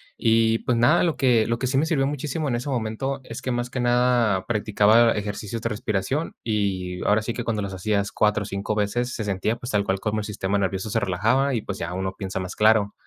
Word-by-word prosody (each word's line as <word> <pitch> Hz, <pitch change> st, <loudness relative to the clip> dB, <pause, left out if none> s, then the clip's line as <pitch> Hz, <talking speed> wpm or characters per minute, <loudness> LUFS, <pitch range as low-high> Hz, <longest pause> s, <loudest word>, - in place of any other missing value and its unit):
Y 115 Hz, 0 st, +3 dB
pues 120 Hz, -, 0 dB
nada, 135 Hz, +9 st, +4 dB
lo 170 Hz, -3 st, 0 dB
que 120 Hz, -5 st, +3 dB
lo 115 Hz, 0 st, 0 dB
que 130 Hz, -, -1 dB
sí 130 Hz, +2 st, 0 dB
me 145 Hz, -, +3 dB
sirvió 135 Hz, -5 st, +1 dB
muchísimo 150 Hz, +2 st, -3 dB
en 125 Hz, -, 0 dB
ese 125 Hz, +4 st, -4 dB
momento 130 Hz, +2 st, -2 dB
es 115 Hz, -, -7 dB
que 130 Hz, -, -3 dB
más 120 Hz, 0 st, -2 dB
que 130 Hz, -, -3 dB
nada 120 Hz, -5 st, +2 dB
practicaba 110 Hz, +1 st, +4 dB
ejercicios 105 Hz, +1 st, -4 dB
de -, -, +1 dB
respiración, 105 Hz, -, -2 dB
y 95 Hz, -5 st, -1 dB
ahora 105 Hz, +1 st, +3 dB
sí 115 Hz, -, -3 dB
que 120 Hz, -, -4 dB
cuando 110 Hz, -2 st, -1 dB
los 100 Hz, -1 st, -5 dB
hacías 100 Hz, +1 st, -1 dB
4 105 Hz, -1 st, +2 dB
o -, -, -7 dB
5 100 Hz, +1 st, -3 dB
veces 120 Hz, +4 st, -1 dB
se 110 Hz, -, -3 dB
sentía, 100 Hz, +3 st, -1 dB
pues, 120 Hz, +2 st, -6 dB
tal 100 Hz, -1 st, +2 dB
cual 95 Hz, -1 st, -1 dB
como 110 Hz, +1 st, -1 dB
el 105 Hz, -, -4 dB
sistema 100 Hz, -1 st, -2 dB
nervioso 95 Hz, +1 st, -2 dB
se 110 Hz, -, +2 dB
relajaba 115 Hz, +10 st, +1 dB
y 115 Hz, -, -1 dB
pues 100 Hz, -1 st, -6 dB
ya 85 Hz, -, -4 dB
uno 95 Hz, +1 st, -3 dB
piensa 95 Hz, -1 st, -4 dB
más 90 Hz, -1 st, -5 dB
claro. 105 Hz, -1 st, +3 dB
110 Hz, 240 wpm, -24 LUFS, 100-120 Hz, -, nada